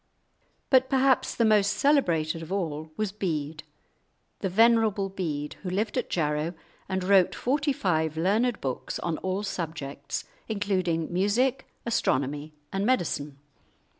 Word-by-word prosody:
But 260 Hz, -1 st, +5 dB
perhaps 265 Hz, -1 st, +3 dB
the 230 Hz, -, +2 dB
most 210 Hz, -2 st, +4 dB
celebrated 170 Hz, -, +2 dB
of 165 Hz, +2 st, -8 dB
all 160 Hz, -5 st, -3 dB
was 215 Hz, -2 st, -1 dB
Bede, 160 Hz, -6 st, -3 dB, 0.8 s
the 195 Hz, -, -1 dB
"Venerable 220 Hz, -1 st, +4 dB
Bede," 155 Hz, -6 st, -4 dB
who 185 Hz, -, -4 dB
lived 205 Hz, +4 st, -1 dB
at -, -, -1 dB
Jarrow 155 Hz, +1 st, -1 dB, 0.3 s
and 190 Hz, -1 st, -1 dB
wrote 190 Hz, -1 st, +4 dB
forty 285 Hz, +3 st, +1 dB
five 160 Hz, -, 0 dB
learned 210 Hz, +7 st, +1 dB
books 130 Hz, -2 st, -3 dB
on 165 Hz, -2 st, -2 dB
all 190 Hz, +2 st, -2 dB
subjects, 160 Hz, -7 st, -4 dB, 0.2 s
including 185 Hz, -6 st, -1 dB
music, 235 Hz, +8 st, +1 dB, 0.2 s
astronomy, 145 Hz, -, 0 dB, 0.2 s
and 195 Hz, 0 st, 0 dB
medicine. 155 Hz, -, 0 dB
190 Hz, 130 wpm, -27 LUFS, 160-215 Hz, 0.8 s, But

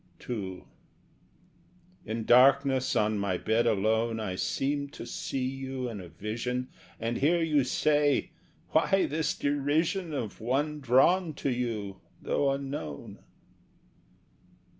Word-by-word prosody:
II 95 Hz, -6 st, -4 dB, 1.4 s
In 110 Hz, +1 st, -3 dB
darkness 130 Hz, +1 st, +5 dB
on 105 Hz, 0 st, +2 dB
my 100 Hz, -2 st, 0 dB
bed 115 Hz, +4 st, +1 dB
alone 110 Hz, +2 st, +1 dB
I 105 Hz, -4 st, -3 dB
seemed 140 Hz, +8 st, -2 dB
to -, -, -8 dB
see 130 Hz, +2 st, -3 dB
you 130 Hz, -1 st, -4 dB
in 110 Hz, -5 st, -6 dB
a 90 Hz, -, -9 dB
vision, 115 Hz, -, -4 dB, 0.3 s
And 115 Hz, +1 st, -2 dB
hear 170 Hz, +5 st, +3 dB
you 150 Hz, -4 st, +3 dB
say: 145 Hz, +3 st, +2 dB, 0.4 s
"Why 190 Hz, +4 st, +3 dB
this 155 Hz, 0 st, -1 dB
derision 155 Hz, +5 st, 0 dB
Of 120 Hz, -9 st, -4 dB
one 145 Hz, +6 st, 0 dB
drawn 150 Hz, +6 st, +3 dB
to 140 Hz, -, -1 dB
you, 110 Hz, -6 st, -3 dB, 0.2 s
though 140 Hz, -, 0 dB
unknown?" 135 Hz, -, -5 dB
130 Hz, 120 wpm, -29 LUFS, 110-145 Hz, 1.4 s, darkness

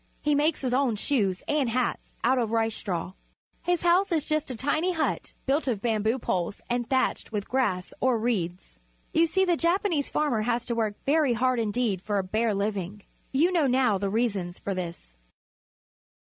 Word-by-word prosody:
He 295 Hz, -, +1 dB
makes 295 Hz, +2 st, +2 dB
his 255 Hz, -2 st, -1 dB
own 255 Hz, -3 st, +2 dB
shoes 205 Hz, -5 st, 0 dB
and 295 Hz, -5 st, +1 dB
hats 245 Hz, +1 st, -2 dB
out 255 Hz, +2 st, +3 dB
of 230 Hz, -3 st, 0 dB
rice 225 Hz, 0 st, +1 dB
straw. 180 Hz, -2 st, -3 dB, 0.5 s
His 355 Hz, -1 st, 0 dB
house 360 Hz, +3 st, +3 dB
is 320 Hz, -4 st, +1 dB
just 310 Hz, -2 st, -1 dB
a 255 Hz, -, -3 dB
tiny 310 Hz, +9 st, 0 dB
hut, 320 Hz, -2 st, -2 dB
built 280 Hz, +2 st, +1 dB
of 235 Hz, -6 st, 0 dB
bamboo 220 Hz, +1 st, +1 dB
poles 185 Hz, -5 st, -2 dB
and 240 Hz, -1 st, -1 dB
thatched 260 Hz, -3 st, 0 dB
with 205 Hz, -2 st, -3 dB
grass 195 Hz, -9 st, 0 dB
or 255 Hz, -2 st, +3 dB
reeds. 180 Hz, -, -2 dB, 0.3 s
You 335 Hz, +1 st, +4 dB
see 380 Hz, +4 st, +2 dB
the 350 Hz, -2 st, +3 dB
Japanese 340 Hz, -3 st, +1 dB
farmer 285 Hz, -8 st, +1 dB
has 235 Hz, +1 st, 0 dB
to 240 Hz, -, -2 dB
work 220 Hz, -3 st, -1 dB
very 290 Hz, -3 st, +3 dB
hard 255 Hz, +1 st, +1 dB
indeed 220 Hz, -3 st, 0 dB
for 205 Hz, 0 st, -1 dB
a 195 Hz, -, +1 dB
bare 215 Hz, +3 st, 0 dB
living. 200 Hz, -1 st, -3 dB, 0.3 s
You 315 Hz, +7 st, +3 dB
know 330 Hz, -6 st, +3 dB
now 250 Hz, -6 st, +2 dB
the 200 Hz, 0 st, -1 dB
reasons 195 Hz, -5 st, -1 dB
for 200 Hz, -, -3 dB
this. 170 Hz, -, -6 dB
240 Hz, 185 wpm, -27 LUFS, 205-290 Hz, 0.5 s, You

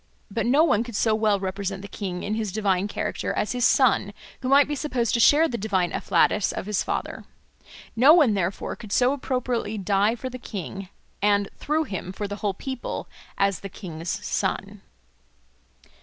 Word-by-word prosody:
But 230 Hz, +3 st, -1 dB
no 280 Hz, +6 st, +5 dB
one 245 Hz, -9 st, +3 dB
could 235 Hz, -2 st, -8 dB
so 220 Hz, +1 st, +2 dB
well 215 Hz, -2 st, +2 dB
represent 195 Hz, 0 st, -4 dB
the -, -, -6 dB
king 185 Hz, -3 st, -5 dB
in 210 Hz, -, -2 dB
his 215 Hz, -2 st, -2 dB
divine 200 Hz, -2 st, +1 dB
character -, -, -3 dB
as 210 Hz, -, -1 dB
his 245 Hz, -2 st, +1 dB
son, 230 Hz, -6 st, +3 dB, 0.3 s
who 255 Hz, -, -2 dB
might 280 Hz, +1 st, +6 dB
be 295 Hz, -, -2 dB
supposed 255 Hz, -5 st, -1 dB
to 235 Hz, -, +2 dB
share 300 Hz, +7 st, +6 dB
the 235 Hz, -, -4 dB
divine 190 Hz, -4 st, 0 dB
afflatus 195 Hz, +2 st, +2 dB
of -, -, -5 dB
his 210 Hz, -2 st, 0 dB
father. -, -, -4 dB, 0.7 s
No 255 Hz, +6 st, +7 dB
one, 305 Hz, -9 st, +6 dB
therefore, 195 Hz, -1 st, -2 dB
could 215 Hz, -3 st, -11 dB
so 250 Hz, +5 st, +3 dB
appropriately 250 Hz, -5 st, -2 dB
die 200 Hz, +3 st, +2 dB
for 250 Hz, +2 st, -6 dB
the 255 Hz, 0 st, -7 dB
king 195 Hz, -3 st, -6 dB, 0.3 s
and, 205 Hz, -1 st, +2 dB
through 310 Hz, +2 st, 0 dB
him, 185 Hz, -, -5 dB
for 205 Hz, +2 st, -4 dB
the 205 Hz, 0 st, -5 dB
whole 205 Hz, -2 st, -2 dB
people, 260 Hz, +3 st, -5 dB, 0.3 s
as 200 Hz, -3 st, +1 dB
the 195 Hz, -, -7 dB
king's 170 Hz, -4 st, -7 dB, 0.2 s
son. -, -, -2 dB
210 Hz, 185 wpm, -25 LUFS, 195-250 Hz, 0.7 s, No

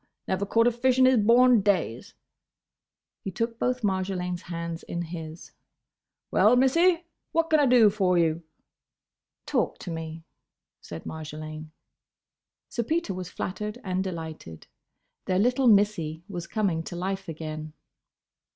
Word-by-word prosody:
Never 190 Hz, +1 st, -1 dB
caught 230 Hz, +3 st, +3 dB
a 245 Hz, -, +4 dB
fish 250 Hz, +2 st, +1 dB
in 260 Hz, -, +6 dB
his 260 Hz, -1 st, +5 dB
born 235 Hz, +2 st, +5 dB
days!" 190 Hz, -, -1 dB, 1.1 s
He -, -, -3 dB
took 230 Hz, +5 st, -3 dB
both 250 Hz, -1 st, -1 dB
Marjolaine's 185 Hz, -2 st, -1 dB
hands 170 Hz, -1 st, -5 dB
in 170 Hz, 0 st, -4 dB
his. 165 Hz, -1 st, -8 dB, 0.8 s
"Well, 220 Hz, +4 st, +5 dB
Missie; 335 Hz, +7 st, +3 dB, 0.3 s
what 330 Hz, 0 st, +1 dB
can 310 Hz, -, +5 dB
I 285 Hz, -, +4 dB
do 240 Hz, -4 st, +6 dB
for 190 Hz, -3 st, +2 dB
you?" 165 Hz, -1 st, +2 dB, 1.0 s
"Talk -, -, 0 dB
to 180 Hz, -, -7 dB
me," 160 Hz, 0 st, -6 dB, 0.6 s
said 85 Hz, -, -8 dB
Marjolaine. 155 Hz, 0 st, -7 dB, 1.0 s
Sir 235 Hz, -, -3 dB
Peter 310 Hz, -, -1 dB
was 180 Hz, -1 st, -6 dB
flattered 210 Hz, +6 st, -5 dB
and 185 Hz, -1 st, -1 dB
delighted. 160 Hz, -, -7 dB, 0.6 s
Their 185 Hz, -, 0 dB
little 250 Hz, +5 st, +2 dB
Missie 200 Hz, -7 st, +2 dB
was 175 Hz, -4 st, -6 dB
coming 195 Hz, -7 st, 0 dB
to -, -, -6 dB
life 190 Hz, +1 st, -3 dB
again. 155 Hz, -1 st, -6 dB
190 Hz, 135 wpm, -26 LUFS, 165-235 Hz, 1.1 s, in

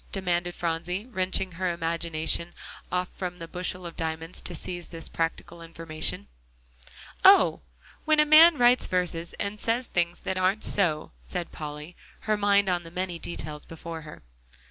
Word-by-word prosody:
demanded 175 Hz, -2 st, -1 dB
Phronsie, 175 Hz, +4 st, -2 dB
wrenching 190 Hz, -4 st, -1 dB
her 180 Hz, +1 st, -2 dB
imagination 170 Hz, 0 st, -1 dB, 0.4 s
off 180 Hz, 0 st, 0 dB
from 180 Hz, -1 st, -5 dB
the 165 Hz, -1 st, -7 dB
bushel 180 Hz, +1 st, -3 dB
of 170 Hz, -, -7 dB
diamonds 160 Hz, +1 st, -4 dB
to 175 Hz, -, -6 dB
seize 175 Hz, +2 st, -5 dB, 0.2 s
practical 165 Hz, +1 st, -3 dB
information. 165 Hz, -, -3 dB, 1.0 s
"Oh! -, -, +7 dB, 0.4 s
when 310 Hz, -1 st, +3 dB
a 300 Hz, -, +6 dB
man 310 Hz, +2 st, +8 dB
writes 245 Hz, +1 st, +5 dB
verses 175 Hz, -2 st, -1 dB
and 205 Hz, +1 st, -4 dB
says 235 Hz, +3 st, 0 dB
things 175 Hz, -4 st, -1 dB
that 185 Hz, -, -2 dB
aren't 190 Hz, +3 st, +1 dB
so," 170 Hz, -7 st, +2 dB
said 170 Hz, -, -5 dB
Polly, 150 Hz, +2 st, -7 dB, 0.3 s
her 215 Hz, -1 st, +1 dB
mind 200 Hz, -1 st, +3 dB
on 180 Hz, -2 st, +1 dB
the 165 Hz, -, -10 dB
many 180 Hz, 0 st, -3 dB
details 155 Hz, -3 st, -5 dB
before 165 Hz, 0 st, -8 dB
her. 150 Hz, -, -12 dB
175 Hz, 150 wpm, -27 LUFS, 165-190 Hz, 1.0 s, man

